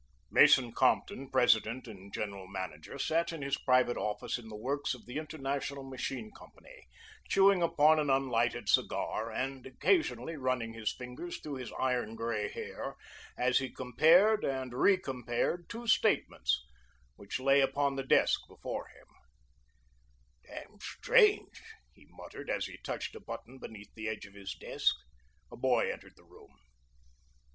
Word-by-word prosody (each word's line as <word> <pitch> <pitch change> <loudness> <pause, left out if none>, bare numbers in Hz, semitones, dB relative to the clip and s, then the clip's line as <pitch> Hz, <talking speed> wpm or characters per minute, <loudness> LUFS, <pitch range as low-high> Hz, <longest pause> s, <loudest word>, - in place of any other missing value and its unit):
Mason 125 -3 +6
Compton, 135 +3 +1
president 125 -1 +3
and 100 -3 -11
general 100 -2 -5
manager, 95 - -6
sat 165 +5 0
in 160 -4 -6
his 140 0 0
private 125 -2 +2
office 105 +3 -2
in 115 - -12
the 110 - -8
works 135 +5 -2
of 125 - -15
the 125 - -6
International 140 -2 -4
Machine 135 - -5
Company, - - -16 0.4
chewing 195 -1 +5
upon 155 -2 +4
an 150 -2 0
unlighted 120 -4 +1
cigar 110 +1 +1
and 130 +2 -3
occasionally 165 - 0
running 130 -4 -1
his 115 -2 -2
fingers 125 +7 -7
through 145 -3 -6
his 130 -2 -7
iron 125 -4 0
gray 115 -2 -2
hair - - -6 0.4
as 125 0 +3
he 135 -1 -3
compared 170 - +4
and 130 -2 -2
recompared 135 - +1
two 235 +1 -7
statements 65 - +2 0.5
which 100 - -5
lay 135 +1 +4
upon 140 +1 +1
the 135 - -2
desk 135 - +3
before - - -6
him. - - -19 1.4
"Damn 210 - -10
strange," 445 - +3 0.3
he - - -21
muttered - - -10
as - - 0
he - - -9
touched - - -4
a - - -7
button 130 - -9
beneath 105 -4 -10
the 110 0 -6
edge 110 -1 -4
of 100 - -15
his 100 -2 -7
desk. - - 0 0.6
A - - -8
boy - - +2
entered - - -14
the - - -21
room. - - -19
130 Hz, 150 wpm, -32 LUFS, 115-150 Hz, 1.4 s, Mason